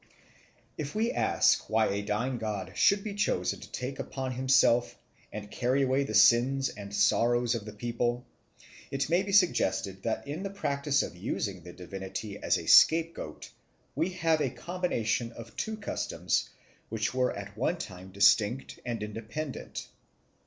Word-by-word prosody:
If 150 +2 -4
we 225 +2 +1
ask - - +2
why 110 0 +3
a 100 +1 -1
dying 115 +5 -2
god 105 -4 -4
should 200 -1 +4
be 210 - -4
chosen 205 +1 0
to - - -12
take 130 +2 -5
upon 130 -1 -4
himself 130 -2 +3 0.3
and 105 -1 -7
carry 130 +3 +1
away 135 +1 +2
the 110 - -4
sins 130 +5 +5
and 100 -1 -9
sorrows 115 +4 +3
of 115 -3 -4
the 105 - -7
people, 120 +3 -2 0.6
it 135 0 -2
may 175 +2 +4
be 200 0 -4
suggested 165 - +2
that 115 +5 -2
in 150 +5 -4
the 195 - -3
practice 140 -7 0
of - - -7
using 95 0 -3
the 90 +1 -11
divinity 95 +3 -6
as - - +1
a - - -6
scapegoat 165 +1 +4 0.4
we 160 +6 0
have 165 -3 +1
a 135 - +1
combination 120 - -2
of 115 0 -11
two 220 0 -3
customs 215 - -2 0.4
which 110 +1 -1
were 130 -1 +1
at 100 0 -8
one 130 +10 0
time 95 - -8
distinct 105 +5 +3
and 120 -3 -3
independent. 115 +7 -6
120 Hz, 160 wpm, -29 LUFS, 105-140 Hz, 0.6 s, sins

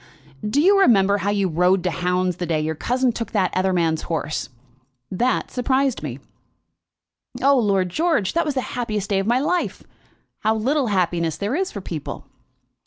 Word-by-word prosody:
"Do 210 +7 0
you 395 +6 +5
remember 200 - +4
how 200 - -1
you 200 -2 +1
rode 180 +2 +2
to 180 - 0
hounds 180 +2 0
the 175 - -3
day 160 -1 0
your 155 +1 -1
cousin 250 - 0
took 230 0 -6
that 190 -4 +1
other 190 +1 +2
man's 165 -3 +1
horse? 155 -4 -3 0.6
That 245 +7 0
surprised 260 +1 0
me." 135 -5 -5 1.2
"Oh, 275 -1 +4
Lord 195 -5 +1
George, 310 - 0
that 335 - +2
was 295 -3 -2
the 260 - +1
happiest 215 -5 -3
day 195 - +2
of 195 - -2
my 240 +2 +3
life. 350 +6 -1 0.6
How 220 +1 +1
little 260 +5 +1
happiness 175 -5 0
there 205 +4 -2
is 375 +2 -1
for 200 - -6
people!" 165 -5 -6
200 Hz, 175 wpm, -22 LUFS, 180-255 Hz, 1.2 s, you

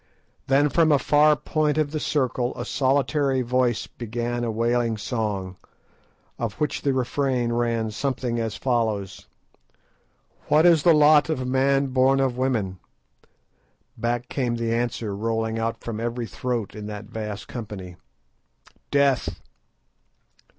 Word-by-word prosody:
Then 140 +2 +4
from 160 +1 +3
a 145 - +6
far 150 +2 +4
point 155 0 0
of 150 -2 +1
the 155 - -2
circle 130 -4 -1
a - - -4
solitary 135 0 +1
voice 125 -1 +1
began 120 +1 -4
a 120 - -1
wailing 115 0 0
song, 105 -5 -3 0.8
of 115 -3 -2
which 150 - -2
the 140 - +1
refrain 130 -2 0
ran 115 -2 0
something 125 0 -2
as 115 -2 -2
follows:— 110 -6 -2 1.2
"What 155 +3 +4
is 170 -3 +6
the 170 -1 +5
lot 150 0 +5
of 130 -5 -1
man 135 +1 +2
born 135 +1 +4
of 130 -2 +1
woman?" 115 -8 -1 1.2
Back 120 +1 -2
came 125 -3 -1
the 115 -1 -1
answer 115 -3 -2
rolling 110 +1 -1
out 115 0 -2
from 115 -2 -4
every 120 +1 -3
throat 120 -3 -3
in 105 -1 -7
that 105 0 -7
vast 105 -1 -6
company— 100 -6 -7 1.0
"_Death! 140 -3 +2
120 Hz, 135 wpm, -24 LUFS, 115-135 Hz, 1.2 s, a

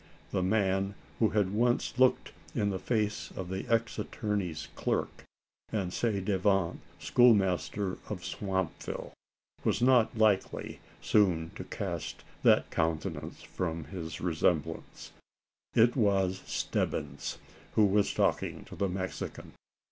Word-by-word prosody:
The 95 - +1
man 95 0 +1 0.2
who 110 - +4
had 100 -2 +1
once 120 +3 +1
looked 130 -1 +4 0.2
in 100 -1 +1
the 95 - -2
face 105 -2 -1
of 90 -2 -5
the 95 +4 -4
ex 115 -1 +1
attorney's 90 -8 -2
clerk, - - -2 0.5
and 95 -5 -1
ci 110 -4 0
devant 95 -2 +1 0.2
schoolmaster 100 -4 +3
of - - -5
Swampville, 95 -4 -3 0.5
was - - +1
not 125 -3 +4
likely 110 -3 +1 0.2
soon 85 -6 +3
to - - -7
cast - - -4 0.2
that - - +4
countenance 80 -1 -2
from 80 -3 -3
his 80 +2 -6
remembrance. 80 -2 -1 0.6
It 115 +2 +5
was 95 -5 +2
Stebbins - - -2 0.4
who 110 - +5
was 100 0 +3
talking - - 0
to - - -10
the 100 - 0
Mexican. 95 0 -5
95 Hz, 120 wpm, -30 LUFS, 90-110 Hz, 0.6 s, It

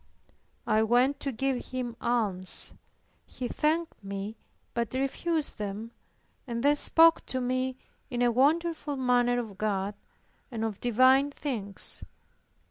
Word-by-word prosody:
I 215 - +2
went 245 +5 +2
to 275 - -2
give 260 +1 -2
him 250 -2 -4
alms; 205 -6 -1 0.5
he 255 - -5
thanked 315 -4 -1
me 200 +2 -5 0.4
but 235 +1 -2
refused 295 +3 -1
them 210 +2 -5 0.6
and 235 -1 -3
then 290 +1 +4
spoke 330 +2 +7
to 260 - -2
me 255 +1 -1 0.3
in 245 -2 -1
a 240 - +3
wonderful 300 +3 +1
manner 245 -2 +2
of 215 -5 -5
God 205 -1 -1 0.6
and 225 -4 -3
of 215 -3 -4
divine 255 +4 +4
things. 235 -9 -3
245 Hz, 125 wpm, -28 LUFS, 220-275 Hz, 0.6 s, spoke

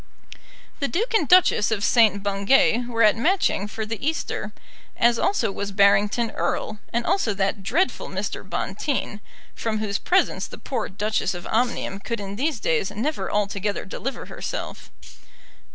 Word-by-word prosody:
The 280 - 0
Duke 440 - -1
and 410 -10 +3
Duchess 360 - +5
of 215 -3 -1
St. 210 -4 +4
Bungay 205 +4 +3
were 230 -1 +1
at 210 0 +6
Matching 245 - +1
for 215 +1 -5
the 225 +2 -5
Easter, 315 +3 -2 0.5
as 235 0 +3
also 230 - +1
was 200 +1 -4
Barrington 205 +3 +3
Erle, 215 -1 -2
and 235 0 -1
also 230 - +1
that 195 +1 -1
dreadful 325 - 0
Mr. - - -4
Bonteen, 255 -7 -3 0.3
from 225 -1 -2
whose 210 -2 -2
presence 375 +1 +1
the - - -10
poor - - -3
Duchess 205 -1 -1
of 175 - -8
Omnium 230 -4 -1
could 230 +2 -4
in 200 0 -6
these 275 +2 -1
days 165 0 0
never 285 +9 -3
altogether 205 -1 -1
deliver 265 +8 -5
herself. - - -6
220 Hz, 150 wpm, -24 LUFS, 200-255 Hz, 0.5 s, at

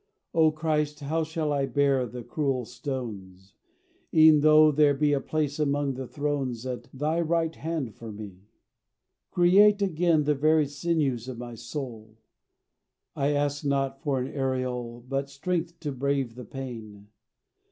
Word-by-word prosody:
O 160 -1 +5
Christ, 150 -1 -1
how 160 +3 -1
shall 160 -1 -2
I 140 -1 0
bear 140 -3 +2
the 120 +2 -8
cruel 135 -3 -1
stones, 105 -8 -7 0.6
E'en 155 -1 +7
though 155 +1 +6
there 145 -1 +4
be 145 +1 +2
a 140 - +1
place 150 -1 -2
among 145 -2 +1
the 130 0 -6
thrones 140 -5 -2
At 120 -2 -5
thy 155 +5 -1
right 165 0 0
hand 155 -8 -3
for 115 -1 -9
me? 100 -2 -10 0.8
Create 200 +4 +5
again 170 -4 +2
The 150 +1 +2
very 155 +2 +3
sinews 140 -4 -1
of 130 -2 -6
my 120 0 -7
soul: 115 -2 -7 1.0
I 145 +1 +1
ask 145 0 -1
not 135 -1 -1
for 140 -4 0
an 130 +3 -5
aureole, 125 -3 -3
But 135 +1 -2
strength 170 +4 -3
to 150 - -3
brave 135 -2 -1
the 125 0 -9
pain. 110 -5 -8
140 Hz, 150 wpm, -27 LUFS, 125-155 Hz, 1.0 s, E'en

